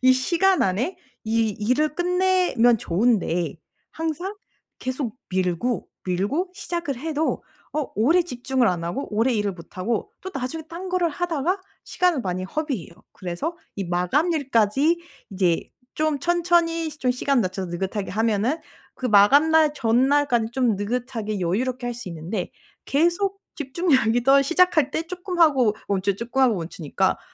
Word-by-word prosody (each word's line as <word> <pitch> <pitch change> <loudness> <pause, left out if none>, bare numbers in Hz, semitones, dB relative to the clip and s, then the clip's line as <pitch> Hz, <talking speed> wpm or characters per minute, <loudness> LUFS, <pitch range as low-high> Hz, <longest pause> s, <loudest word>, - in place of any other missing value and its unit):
이 255 0 +6
시간 345 +8 +2
안에 225 - 0 0.3
이 225 0 +1
일을 255 +9 0
끝내면 360 - +3
좋은데 180 -3 +1 0.3
항상 325 +5 -3 0.4
계속 255 -3 -3
밀고 185 +6 -1 0.2
밀고 205 - -1
시작을 340 -8 -3
해도 315 +2 -1 0.3
어 305 -2 -1
오래 310 - +4
집중을 250 -5 0
안 175 -2 -1
하고 175 +12 -3
오래 235 +4 +2
일을 205 -2 0
못하고 185 +5 -4
또 375 - -6
나중에 275 +3 -4
딴 350 +3 -6
거를 360 -2 +1
하다가 350 +3 -1 0.2
시간을 360 -6 +1
많이 185 -1 -2
허비해요. 260 - -4 0.2
그래서 185 - -4 0.2
이 200 - -3
마감일까지 270 - +2 0.3
이제 185 -4 0 0.3
좀 310 -2 0
천천히 340 -1 +2
좀 290 -4 -1
시간 255 +1 +1
낮춰서 185 0 -3
느긋하게 190 +4 -3
하면은 225 - +1 0.4
그 - - -10
마감날 295 +9 +5 0.4
전날까지는 240 -6 +1
좀 245 -4 +2
느긋하게 220 -1 -3
여유롭게 245 +8 -1
할 245 - -1
수 235 -4 -7
있는데 175 +5 -4 0.4
계속 345 +7 +1 0.2
집중력이 265 -6 +1
떨 275 +2 +6
시작할 325 -1 +3
때 315 - -1
쪼끔 365 +1 -5
하고 270 -10 +4
멈추 195 0 0
쪼끔 235 +5 -2
하고 250 -4 +4
멈추니까 165 -3 -1
255 Hz, 305 characters per minute, -24 LUFS, 205-325 Hz, 0.4 s, 이